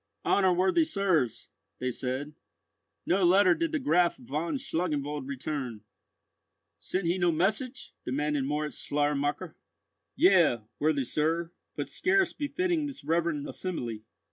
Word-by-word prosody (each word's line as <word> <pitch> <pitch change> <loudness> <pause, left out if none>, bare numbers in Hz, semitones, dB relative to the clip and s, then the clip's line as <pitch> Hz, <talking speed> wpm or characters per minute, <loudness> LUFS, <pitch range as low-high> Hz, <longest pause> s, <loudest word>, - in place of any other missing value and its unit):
"Honour 190 -2 +4
worthy 190 - +3
sirs," 185 - 0 0.3
they 130 0 -2
said, 130 +4 -4 0.7
"no 190 +2 +2
letter 185 +1 +6
did 330 - -1
the 315 - +1
Graf 180 - +2
von 150 - -3
Schlangenwald 150 - -2
return." 135 -5 -4 1.0
"Sent 185 0 -2
he 175 +3 +1
no 175 -1 +3
message?" 215 - -1
demanded 145 +1 -1
Moritz 150 +2 -2
Schleiermacher. 145 0 -1 0.6
"Yea, 170 - +5 0.2
worthy 150 -2 +2
sir, 165 +5 0 0.2
but - - -3
scarce 385 -1 +2
befitting 310 +2 -1
this 280 -1 -9
reverend 165 -3 0
assembly." 120 - -4
165 Hz, 120 wpm, -29 LUFS, 145-195 Hz, 1.0 s, letter